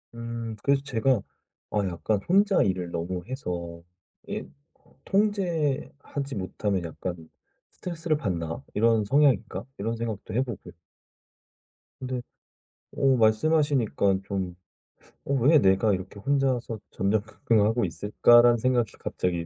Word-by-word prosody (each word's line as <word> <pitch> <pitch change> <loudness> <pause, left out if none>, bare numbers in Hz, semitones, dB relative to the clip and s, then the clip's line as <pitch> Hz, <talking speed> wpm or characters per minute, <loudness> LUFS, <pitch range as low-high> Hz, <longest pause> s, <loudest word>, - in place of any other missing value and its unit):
음. 115 -1 -5
그래서 140 -1 +3
제가 125 -3 +1 0.5
'아 - - -1
약간 95 +4 -1
혼자 200 +2 +4
일을 90 -3 -1
너무 90 +2 -3
해서 85 -10 -5 0.4
이게 - - -4 0.6
통제하지 155 - -1
못하면 95 0 -2
약간 85 0 -6 0.4
스트레스를 165 -3 -2
받나? 85 - -3
이런 110 0 +3
성향인가'? 135 -1 +2
이런 115 +3 -2
생각도 110 -5 -5
해 120 - +2
보고요. 120 -7 -6 1.3
근데 130 -1 -3 0.7
어 135 -2 +3
말씀하시니까 115 -4 +2
좀 95 -3 -3 0.7
'어 140 - -1
왜 140 +4 +5
내가 95 0 +3
이렇게 95 +2 -5
혼자서 130 -3 0
전전긍긍하고 110 +2 +1
있을까?'라는 120 +7 +5
생각이 120 0 +1
갑자기 85 -2 -2
115 Hz, 270 characters per minute, -26 LUFS, 95-135 Hz, 1.3 s, 왜